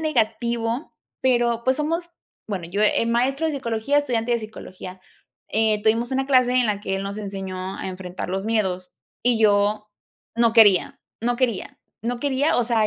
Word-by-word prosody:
negativo, 235 -2 -1 0.3
pero, 240 -2 +2
pues, 260 0 +2
somos, 330 +3 -2 0.4
bueno, 190 -5 -4
yo 190 +5 -3
el 220 +2 +2
maestro 260 +6 +1
de 315 - -1
psicología, 240 +1 0
estudiante 245 -4 0
de 235 - +2
psicología, 185 -4 -9 0.5
eh, 215 -1 +1
tuvimos 230 +4 +1
una 265 0 0
clase 255 -2 +4
en 245 - +2
la 205 -2 -1
que 195 - -2
él 195 - -3
nos 200 +1 -5
enseñó 190 -2 -5
a - - -4
enfrentar 185 -1 -6
los 190 +1 -2
miedos 190 -5 -1 0.3
y 240 -1 +2
yo 210 0 +2 0.5
no 235 -1 +3
quería, 205 -5 +5 0.2
no 240 +2 0
quería, 235 -6 -1 0.2
no 240 +1 -2
quería. 285 +2 +1
O 245 - +2
sea, 225 -2 +2
225 Hz, 175 wpm, -23 LUFS, 205-245 Hz, 0.5 s, quería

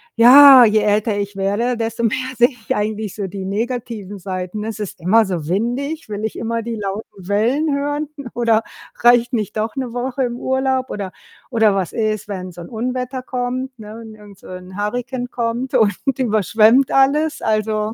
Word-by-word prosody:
ja, 260 +2 +9
je 215 -1 +3
älter 210 +1 +1
ich 200 0 -4
werde, 210 +6 0
desto 230 +1 -3
mehr 255 +3 -1
sehe 240 +1 +5
ich 245 -5 -5
eigentlich 210 -1 -3
so 200 -2 -4
die 190 0 -6
negativen 215 -1 -4
Seiten. 185 +2 -5
Es 225 -1 -5
ist 205 -3 -6
immer 215 +6 +3
so 175 -6 -4
windig, 245 - -2
will 210 +1 -4
ich 220 - -5
immer 230 0 -2
die 230 0 -5
lauten 200 -2 -6
Wellen 255 +9 +1
hören? 290 +1 -2 0.2
Oder 230 -2 +2 0.4
reicht 240 0 +4
nicht 215 -5 -2
doch 215 +1 -2
'ne 255 -3 -3
Woche 255 +2 -2
im 240 -1 -2
Urlaub? 265 0 -1
Oder 195 -3 -5 0.4
oder 225 -4 +3
was 190 -3 -2
ist, 215 -3 -2
wenn 185 -3 -6
so 175 - -11
'n 170 - -10
Unwetter 250 +2 -4
kommt, 255 0 -4
ne? 215 0 -9
Und 220 -1 -11
irgend 205 -2 -15
so - - -16
'n 185 0 -9
Hurrikan 245 +4 -3
kommt 240 +3 -3
und 210 -6 +3 0.2
überschwemmt 225 +2 +3
alles? 295 +3 +2
Also 215 0 -1
225 Hz, 180 wpm, -19 LUFS, 205-250 Hz, 0.4 s, ja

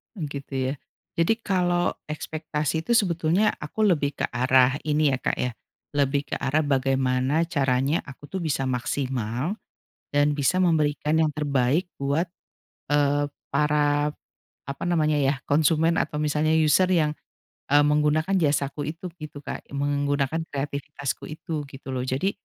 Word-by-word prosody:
Oh 180 - -5
gitu 140 -1 -7 0.2
ya. - - -2 0.4
Jadi 165 +6 +4
kalau 180 -4 +1 0.2
ekspektasi 155 0 -3
itu 240 - +2
sebetulnya 180 -1 +3
aku 220 - -5
lebih 150 -8 +2
ke - - -1
arah 130 +1 +3
ini 150 -1 +3
ya 130 - +1
Kak - - -1
ya, 125 - -1 0.5
lebih 140 0 +1
ke - - -1
arah 150 +4 +1
bagaimana 135 0 +1
caranya 135 0 +1
aku 145 0 -12
tuh 190 - -3
bisa 140 -6 -1
maksimal 125 - -2 0.6
dan 145 +1 +4
bisa 150 +6 +2
memberikan 155 -2 +2
yang 160 - +4
terbaik 145 +3 +1
buat, 145 +6 0 0.6
eee, 145 0 +2 0.2
para, 145 0 +2 0.5
apa 140 +1 -6
namanya 155 -3 +2
ya, 135 -1 +1
konsumen 160 +3 +2
atau 150 0 -1
misalnya 150 +1 +1
user 160 +3 +4
yang, 170 -5 +2 0.6
e 140 - 0
menggunakan 150 +4 +2
jasaku 145 -2 0
itu 175 +3 -9
gitu 155 -2 -8
Kak, - - -6
menggunakan 145 +1 0 0.2
kreativitasku 140 0 -4
itu 155 -1 -5
gitu 135 0 -12
loh. 130 -1 -2
Jadi 135 +10 0
145 Hz, 140 wpm, -25 LUFS, 140-160 Hz, 0.6 s, Jadi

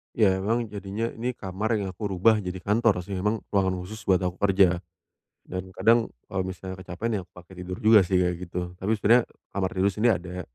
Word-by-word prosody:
Ya 110 -4 +5 0.2
memang 115 +1 0
jadinya 100 +3 -4
ini 120 +3 -3
kamar 105 0 -3
yang 95 - -3
aku 95 +3 -7
rubah 110 +5 +4
jadi 95 -2 -4
kantor 105 -1 +2
sih 95 +2 -5
emang 105 +4 0
ruangan 95 -2 +1
khusus 110 +5 -8
buat 95 -2 +3
aku 90 -1 -2
kerja, 95 -3 +4 0.7
dan 95 0 -6
kadang 115 +4 +3 0.2
kalau 95 - -2
misalnya 95 0 -6
kecapekan 95 +6 -3
ya 100 - -1
aku 90 - -17
pakai 90 +1 -15
tidur 90 +2 -5
juga 110 -2 +6
sih 95 0 +1
kayak 90 -1 +2
gitu 90 0 -4
tapi 110 +3 +1
sebenernya, 115 +4 +5 0.3
kamar 95 -2 0
tidur 95 +1 +2
sini 115 +3 +2
ada, 90 -2 -1
95 Hz, 205 wpm, -26 LUFS, 90-110 Hz, 0.7 s, juga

